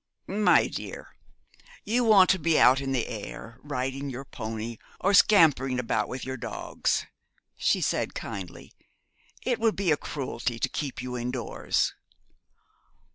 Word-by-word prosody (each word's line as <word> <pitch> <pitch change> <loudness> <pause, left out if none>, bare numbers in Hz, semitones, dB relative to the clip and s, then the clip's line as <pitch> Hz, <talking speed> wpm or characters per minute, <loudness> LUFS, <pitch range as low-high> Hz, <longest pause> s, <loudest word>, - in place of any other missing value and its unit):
'My 210 +2 +4
dear, - - -7 0.7
you 240 +3 +1
want 205 -5 +6
to 190 - +1
be 165 -1 +2
out 130 +2 +6
in 135 -1 -3
the 125 -3 0
air, 115 +2 -8
riding 135 0 -3
your 135 +1 -6
pony, 110 -1 -6 0.2
or 200 +2 +2
scampering 145 - +5
about 125 -2 0
with 130 - -6
your 130 0 -4
dogs,' - - -2 0.5
she - - +1
said, - - -1
kindly. 95 -3 -7 0.7
'It 245 -2 0
would 225 -1 +2
be 190 -4 +1
a 150 - +3
cruelty 125 -5 -4
to - - -1
keep 135 -4 -4
you 125 -1 -5
indoors.' 125 0 -1
135 Hz, 140 wpm, -27 LUFS, 125-175 Hz, 0.7 s, want